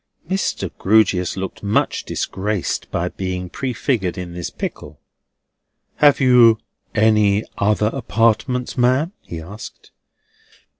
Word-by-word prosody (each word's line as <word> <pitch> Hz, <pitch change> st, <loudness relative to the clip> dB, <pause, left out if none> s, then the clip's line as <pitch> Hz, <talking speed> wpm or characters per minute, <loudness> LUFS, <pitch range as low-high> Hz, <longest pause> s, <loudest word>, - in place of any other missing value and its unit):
Mr. 190 Hz, +2 st, -2 dB
Grewgious 95 Hz, -4 st, +2 dB
looked 95 Hz, 0 st, -5 dB
much 100 Hz, 0 st, 0 dB
disgraced 100 Hz, 0 st, -2 dB
by 90 Hz, +1 st, -1 dB
being 90 Hz, -1 st, -4 dB
prefigured 120 Hz, -7 st, -1 dB
in 90 Hz, -1 st, -6 dB
this 85 Hz, -1 st, -4 dB
pickle. 75 Hz, 0 st, -7 dB, 1.0 s
"Have 145 Hz, -1 st, +5 dB
you 125 Hz, -4 st, +6 dB, 0.4 s
any 105 Hz, -1 st, +3 dB, 0.2 s
other 105 Hz, +1 st, +2 dB
apartments, 115 Hz, +2 st, 0 dB
ma'am?" 130 Hz, +7 st, +2 dB
he 85 Hz, -, -7 dB
asked. 100 Hz, +7 st, -10 dB
105 Hz, 105 wpm, -20 LUFS, 90-120 Hz, 1.0 s, you